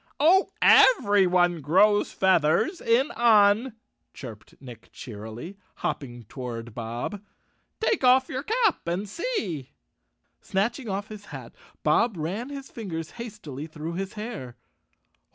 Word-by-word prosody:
" - - -53
Oh, 360 +6 +5
everyone 185 - +5
grows 200 +8 +3
feathers 190 - +2
in 255 +7 +2
Un," 220 -1 +4 0.4
chirped 110 -6 -10
Nick 125 -4 -12
cheerily, 115 - -9 0.2
hopping 120 -4 -4
toward 120 -1 -7
Bob. 120 - -5 0.6
"Take 445 - 0
off 260 +1 +5
your 260 - -4
cap 440 - 0
and 180 +5 -2
see." 200 - -4 0.7
Snatching 230 +5 -2
off 200 +2 -3
his 210 -1 -10
hat - - -10 0.3
Bob 230 -5 +2
ran 190 - -4
his 275 -1 -8
fingers 165 -8 -6
hastily 200 - -8
through 160 +1 -6
his 190 +2 -4
hair. 210 - -7
195 Hz, 120 wpm, -26 LUFS, 150-235 Hz, 0.7 s, Oh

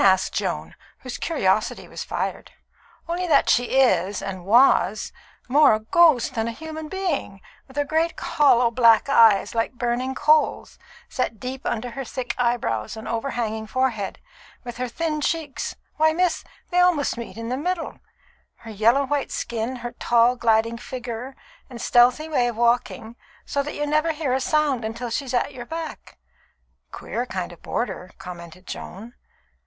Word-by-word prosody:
asked 190 -1 +4
Joan, - - -3 0.3
whose 255 -2 -6
curiosity 215 - 0
was - - -6
fired. - - -4 0.6
"Only 355 +2 -2
that 295 -4 +4
she 245 +2 +2
is, 190 -6 +3
and 190 -2 -6
was, 215 -2 +4 0.4
more 285 -2 +5
a - - -3
ghost 260 +1 +4
than 225 -2 -1
a - - -2
human 315 +4 -7
being, 350 - -3 0.3
with 265 +1 -15
her 290 - +1
great, 320 +3 0
hollow, 250 -5 +3
black 230 +1 +5
eyes, 220 -6 +5
like 230 +1 -1
burning 245 +2 -2
coals, 305 +1 +2 0.3
set 230 -4 -3
deep 260 +1 -5
under 235 +2 -2
her 270 +3 -5
thick 255 0 -4
eyebrows 225 - -1
and 220 - -8
overhanging 225 -2 -3
forehead; 240 -5 -1 0.5
with 240 -1 -7
her 250 0 -2
thin 305 +4 -2
cheeks 305 -3 -2 0.2
why, 315 0 +4
miss, 360 0 +1 0.3
they 355 - +2
almost 355 -6 +3
meet 235 -2 -8
in 230 0 -5
the 250 - -1
middle 335 +4 -3 0.6
her 225 - -9
yellow 230 +7 +3
white 285 0 -1
skin, 235 +2 -3
her 240 - -3
tall, 240 0 +3
gliding 230 -1 +1
figure 250 +2 -6 0.3
and 245 -2 -9
stealthy 245 +7 +4
way 255 -6 +1
of 235 -2 -4
walking, 235 -1 0 0.3
so 280 - -1
that 295 +1 -5
you 295 - -1
never 305 +2 +1
hear 295 -4 -1
a 265 - +1
sound 295 -4 +1 0.2
till 240 -1 -5
she's 260 0 -2
at 245 - 0
your 240 -2 -8
back." 325 0 -7 0.7
"Queer 245 +1 -4
kind 185 -6 -4
of 170 - -14
boarder," 185 -6 -3
commented 175 0 -10
Joan. 220 +6 -8
245 Hz, 160 wpm, -23 LUFS, 225-290 Hz, 0.7 s, more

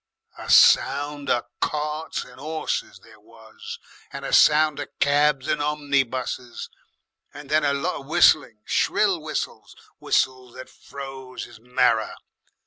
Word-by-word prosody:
"A - - -8
sound 145 0 +4
of 120 - +1 0.2
carts 150 +1 -3
and 125 0 -16
'orses 155 +1 -4
there - - -18
was, 460 0 -12 0.3
and - - -7
a - - -4
sound 155 0 +5
of 145 - -4
cabs 145 -1 +2
and 150 - 0
omnibuses, 135 -4 -2 0.6
and 145 -1 -10
then 155 0 +3
a 140 -1 +2
lot 150 +6 -2
of 135 - -13
whistling, 120 -8 +3
shrill - - +1
whistles, - - -5 0.2
whistles 130 -2 -1
that 130 0 -10
froze 135 -2 -9
'is - - -15
marrer. 125 +2 +1
145 Hz, 135 wpm, -23 LUFS, 130-150 Hz, 0.6 s, sound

